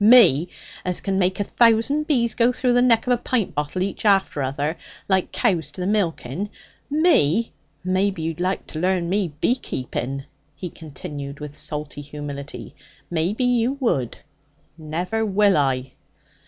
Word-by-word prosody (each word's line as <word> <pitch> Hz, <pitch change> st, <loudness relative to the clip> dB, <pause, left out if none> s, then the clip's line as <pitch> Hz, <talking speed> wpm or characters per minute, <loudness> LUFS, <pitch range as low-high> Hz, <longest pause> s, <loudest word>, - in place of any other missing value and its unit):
Me! 200 Hz, -, +7 dB, 0.4 s
As 180 Hz, -1 st, -1 dB
can 195 Hz, -1 st, -1 dB
make 185 Hz, +1 st, +1 dB
a -, -, +2 dB
thousand 235 Hz, +8 st, +3 dB
bees 235 Hz, -6 st, +2 dB
go 235 Hz, +1 st, +3 dB
through 250 Hz, 0 st, +1 dB
the 245 Hz, -, +4 dB
neck 235 Hz, -3 st, +4 dB
of 250 Hz, -, +3 dB
a -, -, +2 dB
pint 235 Hz, -3 st, -1 dB
bottle 150 Hz, +6 st, -1 dB
each 195 Hz, -, -4 dB
after 195 Hz, -8 st, +3 dB
other, 140 Hz, +4 st, -1 dB, 0.3 s
like 190 Hz, -2 st, +1 dB
cows 175 Hz, -, +1 dB
to 150 Hz, -, -11 dB
the -, -, -1 dB
milking! 190 Hz, -, -1 dB, 0.4 s
Me! 255 Hz, -, +3 dB, 0.3 s
Maybe 185 Hz, -1 st, 0 dB
you'd 165 Hz, +1 st, -3 dB
like 185 Hz, +2 st, -1 dB
to 155 Hz, -, -7 dB
learn 180 Hz, 0 st, +1 dB
me 190 Hz, -3 st, 0 dB
beekeeping?' 135 Hz, -, -2 dB, 0.3 s
he 180 Hz, -3 st, -6 dB
continued 140 Hz, -2 st, -8 dB
with 150 Hz, -1 st, -7 dB
salty 150 Hz, -1 st, -5 dB
humility. 145 Hz, -1 st, -7 dB, 0.4 s
'Maybe 175 Hz, +8 st, 0 dB
you 245 Hz, 0 st, +2 dB
would! 230 Hz, -, -1 dB, 0.6 s
Never 170 Hz, +8 st, -2 dB
will 205 Hz, -1 st, +3 dB
I!' 135 Hz, -3 st, +1 dB
185 Hz, 155 wpm, -23 LUFS, 150-225 Hz, 0.6 s, Me